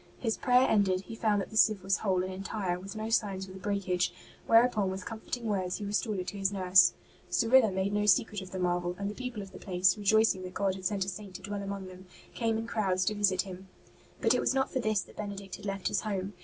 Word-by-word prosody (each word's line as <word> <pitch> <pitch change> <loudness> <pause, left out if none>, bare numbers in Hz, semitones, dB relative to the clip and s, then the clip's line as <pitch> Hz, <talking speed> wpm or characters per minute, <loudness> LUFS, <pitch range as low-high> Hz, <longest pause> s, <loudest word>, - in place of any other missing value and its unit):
His 225 -3 -1
prayer 250 0 +4
ended, 190 -3 +2
he 210 - -10
found 210 -3 +1
that - - -7
the - - -9
sieve 215 -3 +4
was 195 0 +2
whole 185 -3 0
and 185 0 -4
entire, 190 -1 -3
with 195 +3 -9
no 215 +1 -4
sign 205 -3 +1
of 190 0 -5
the 190 - -11
breakage, 185 -3 0 0.4
whereupon 230 -4 +4
with 190 0 -5
comforting 230 +1 -5
words 190 -4 -1
he 205 - -5
restored 210 +1 -1
it 185 - -3
to 200 - -8
his 195 0 +1
nurse. 185 -2 +5 0.4
Cyrilla 240 -1 +4
made 190 +2 -1
no 210 0 +1
secret 210 +1 +3
of 190 - -9
the 190 - -6
marvel, 175 -1 0
and 200 0 -3
the - - -8
people 250 -3 -5
of 195 - -12
the - - -11
place, 185 -1 +2
rejoicing 210 -1 +3
that 185 0 -8
God 195 -1 +1
had 190 -1 -9
sent 195 0 0
a - - -11
Saint 195 0 -7
to - - -8
dwell 205 0 -4
among 200 -1 -5
them, 185 0 -12 0.3
came 225 -2 0
in 225 - -3
crowds 190 -5 0
to 215 - +1
visit 200 -3 +2
him. 190 -1 -10 0.5
But - - +4
it - - +2
was - - +1
not 265 0 +1
for 260 - -1
this 215 -4 +1
that - - -14
Benedict 200 -2 -6
had 210 - -12
left 195 -1 -2
his - - 0
home. 200 -2 -3
200 Hz, 255 wpm, -30 LUFS, 185-215 Hz, 0.5 s, nurse